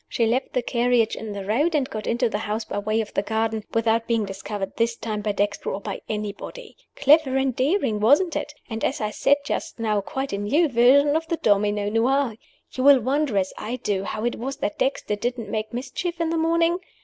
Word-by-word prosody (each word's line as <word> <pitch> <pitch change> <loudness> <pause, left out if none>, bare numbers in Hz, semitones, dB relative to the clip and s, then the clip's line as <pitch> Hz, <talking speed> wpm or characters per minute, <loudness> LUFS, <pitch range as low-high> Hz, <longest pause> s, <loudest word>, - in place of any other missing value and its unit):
She 230 - +1
left 240 +4 0
the 250 - 0
carriage 240 -2 +2
in 220 -1 -6
the 200 -1 -5
road, 290 - +1
and 275 -3 +1
got 215 -5 -6
into 240 +1 +1
the 210 -2 -2
house 220 +1 -3
by - - -3
way 215 +2 0
of 215 - -7
the - - +1
garden 220 +1 -1
without 230 0 +1
being 230 -3 +1
discovered, 195 0 -5
this 230 0 +1
time, 215 -2 -4
by 210 0 0
Dexter 200 0 -1
or 195 - -3
by - - -6
anybody. 210 - -6 0.2
Clever 285 -1 +4
and 265 -2 0
daring, 265 - +1
wasn't 290 - +4
it? - - -3 0.2
And, 220 -1 -5
as 270 - 0
I 215 -1 -2
said 285 - +3
just - - -3
now, 215 -3 0
quite 265 +4 -4
a 200 - -1
new 290 +12 +2
version 275 +4 +5
of 325 +1 -1
the 335 - -1
'Domino 205 -2 +2
Noir.' 240 +2 +1 0.4
You 255 - -3
will 280 -1 +8
wonder, 265 -1 0
as 190 -1 0
I 230 +4 -3
did, 200 -5 -2
how 215 +2 -3
it 240 - -1
was 270 +3 -4
that 205 - -3
Dexter 265 -5 0
didn't 240 +2 -3
make 215 0 -3
mischief 280 +8 -4
in 330 -1 0
the - - 0
morning? 335 +2 +2
230 Hz, 220 wpm, -24 LUFS, 210-275 Hz, 0.4 s, will